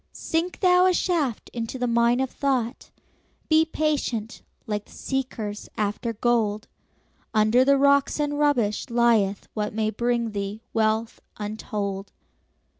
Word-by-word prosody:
Sink 335 +3 -2
thou 365 -1 +5
a 365 - +3
shaft 310 - -1
into 230 +2 -4
the 250 - -1
mine 235 +1 +3
of 265 - -2
thought; 260 -4 -1 0.6
Be 315 0 +5
patient, 285 -8 -2 0.2
like 210 -3 -3
the - - -21
seekers 235 -6 -4
after 215 +3 -1
gold; 220 -2 0 0.7
Under 215 +4 +5
the 280 +1 +4
rocks 280 +1 +3
and 290 0 -1
rubbish 245 -9 +1
lieth 230 -5 +2
what 210 -1 -3
May 220 -1 0
bring 235 0 0
thee 200 +2 -4
wealth 220 +1 0 0.2
untold. 205 -2 -4
235 Hz, 130 wpm, -25 LUFS, 215-275 Hz, 0.7 s, thou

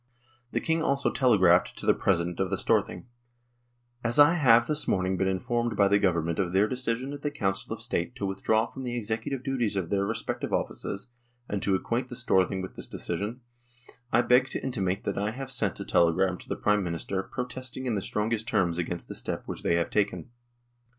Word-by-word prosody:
The - - 0
King 165 0 0
also 140 -3 +1
telegraphed 95 -9 +4
to - - -6
the - - +5
President 90 -1 0
of 95 -1 0
the 95 - -1
Storthing: 100 -4 0 0.5
" 120 0 -40
As 120 0 +1
I 145 +3 +8
have 120 -8 +5
this 150 +3 0
morning 95 0 +1
been 95 +1 0
informed 120 +5 -1
by 100 - +5
the 100 +1 +4
Government 85 -4 +1
of 90 -2 0
their 100 +3 +4
decision 125 +2 -2
at 145 - -7
the 145 - -1
Council 95 -9 -2
of - - -4
State 90 +9 -2
to 105 - -3
withdraw 100 +3 +1
from 135 - -9
the 120 -1 -3
executive 115 +4 -3
duties 125 -6 -1
of 95 -2 -2
their 100 -1 +2
respective 110 +3 -3
offices, 100 +5 -3 0.4
and 100 -2 -2
to 95 -1 +2
acquaint 120 +6 -2
the 125 - -6
Storthing 95 -5 +1
with 95 - -7
this - - -6
decision, 105 +8 -4 0.7
I 120 +2 +4
beg 125 +2 +4
to - - -4
intimate 100 -7 -1
that 100 - -2
I 105 +1 0
have 130 +3 -6
sent 105 -8 0
a - - -5
telegram 90 +2 +2
to - - -14
the - - -1
Prime 105 -1 +2
Minister 90 +2 -2
protesting 130 +3 -5
in 120 - 0
the 100 - -1
strongest 110 +3 -1
terms 85 -2 +1
against 85 0 -4
the - - -6
step - - -4
which - - -6
they 85 - +2
have 85 0 0
taken." 100 -3 -1
105 Hz, 210 wpm, -28 LUFS, 95-125 Hz, 0.7 s, I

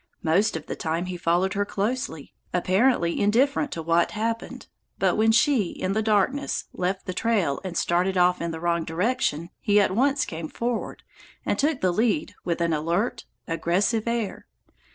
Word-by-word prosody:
Most 175 +4 +2
of 155 - -9
the - - -5
time 165 +2 -2
he 180 0 -5
followed 175 +2 +1
her 205 - +1
closely, 205 - -3 0.2
apparently 185 0 +2
indifferent 265 +8 +2
to 165 - -5
what 170 +1 +2
happened, 230 +1 -3 0.3
but - - +2
when 220 +1 +4
she, 230 -5 +3
in 185 - -2
the 220 - +1
darkness, 220 +6 +1
left 185 +1 -2
the 185 - -3
trail 190 -9 0
and 180 -3 -4
started 180 +2 +1
off 180 0 +3
in 170 - -2
the 160 -1 -5
wrong 170 0 0
direction, 170 -2 -1
he 205 0 +3
at 195 -2 +2
once 270 +2 +2
came 160 -5 -6
forward, 235 0 -3 0.4
and - - 0
took 290 -1 +1
the 185 -1 +2
lead 215 -5 0
with 170 -1 -2
an 170 -1 +1
alert, 170 +9 -1 0.2
aggressive 190 +7 0
air. 235 -3 -2
190 Hz, 175 wpm, -25 LUFS, 170-230 Hz, 0.4 s, when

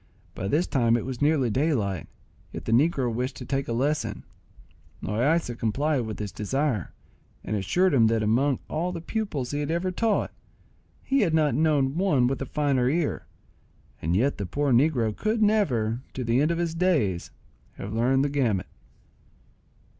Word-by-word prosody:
By 95 - -4
this 155 - +2
time 120 -4 +2
it 115 - -4
was 130 -2 -5
nearly 145 -5 +2
daylight, 110 - 0 0.4
yet - - -7
the - - -2
negro 130 -1 +2
wished 125 +3 -2
to - - -8
take 135 0 -2
a - - -3
lesson. 130 -2 -1 0.8
Loaysa 120 - +1
complied 130 +2 0
with 110 -3 -5
his 105 -1 -5
desire, 125 - -1 0.5
and 110 - -2
assured 160 - +1
him 115 -5 +5
that 110 -1 +1
among 125 +5 +2
all 170 +4 -2
the 175 - -5
pupils 165 - -3
he 145 - -2
had 145 0 -2
ever 170 +3 0
taught, 220 +3 0 0.7
he 275 0 +1
had 170 -9 +2
not 150 -4 +3
known 145 0 +2
one 155 -10 +3
with 135 +2 -1
a 135 - -3
finer 140 -4 +1
ear; 155 +1 -1 0.7
and 85 +3 0
yet 130 +6 +1
the 100 - -3
poor 145 +8 0
negro 120 -5 +2
could 220 +1 -1
never, 125 - +1
to 130 - -3
the 120 +3 +2
end 150 - +2
of 170 - 0
his 170 -1 -1
days, 155 - +1 0.4
have 100 +2 -7
learned 130 +4 +2
the - - 0
gamut. 120 -10 0
135 Hz, 175 wpm, -26 LUFS, 115-155 Hz, 0.8 s, him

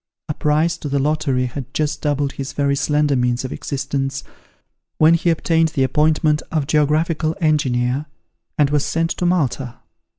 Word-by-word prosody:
A 150 - -2
prize 155 +3 +1
in 145 - -3
the 140 - 0
lottery 140 -3 0
had 130 +1 -6
just 150 -1 -1
doubled 145 -2 0
his 135 -1 -6
very 140 -1 +1
slender 145 0 +1
means 125 0 0
of 130 - -4
existence, 135 -1 -3 0.7
when 160 +1 +6
he 170 +1 +2
obtained 165 0 +2
the 135 - +2
appointment 150 +2 +2
of 155 -3 0
geographical 155 +2 +1
engineer, 140 -3 +1 0.5
and 145 -1 +3
was 145 -1 +2
sent 165 0 -1
to 180 - -1
Malta. 135 -8 0
150 Hz, 160 wpm, -20 LUFS, 135-155 Hz, 0.7 s, when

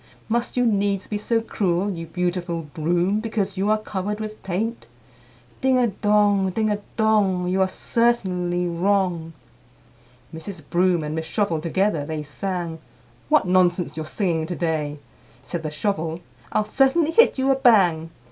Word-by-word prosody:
Must 235 +2 -1
you 245 - +3
needs 200 -3 +1
be 210 - -3
so 225 +2 +1
cruel, 195 -3 0
you 165 -3 -6
beautiful 175 -1 -2
Broom, 175 +6 0
Because 215 -3 -2
you 195 +2 0
are 215 - +4
covered 210 0 -4
with 215 0 -6
paint? 215 +6 -3 0.7
Ding 260 -1 +3
a 250 - +4
dong, 205 -1 +2
ding 215 +3 0
a 205 - -1 0.2
dong! 205 -5 +2
You 185 +1 +1
are 190 - +4
certainly 185 -5 0
wrong." 175 -2 0 1.0
IV. 160 - -7
Mrs. 180 -4 -8
Broom 175 -2 +2
and 150 0 -4
Miss 160 0 -3
Shovel 170 -4 0
together 175 -1 0
they 155 +1 -4
sang, 170 +1 -4 0.5
"What 305 -8 +4
nonsense 180 -2 +2
you're 155 -1 -5
singing 165 -3 -1
to 175 - -3
day!" 155 -4 -2 0.5
Said 170 +5 -4
the 155 - -3
Shovel, 160 +1 -2 0.3
"I'll 215 - +1
certainly 280 +7 +2
hit 460 +1 +5
you 265 +1 +2
a - - +4
bang!" 185 -11 +4
190 Hz, 160 wpm, -23 LUFS, 170-215 Hz, 1.0 s, hit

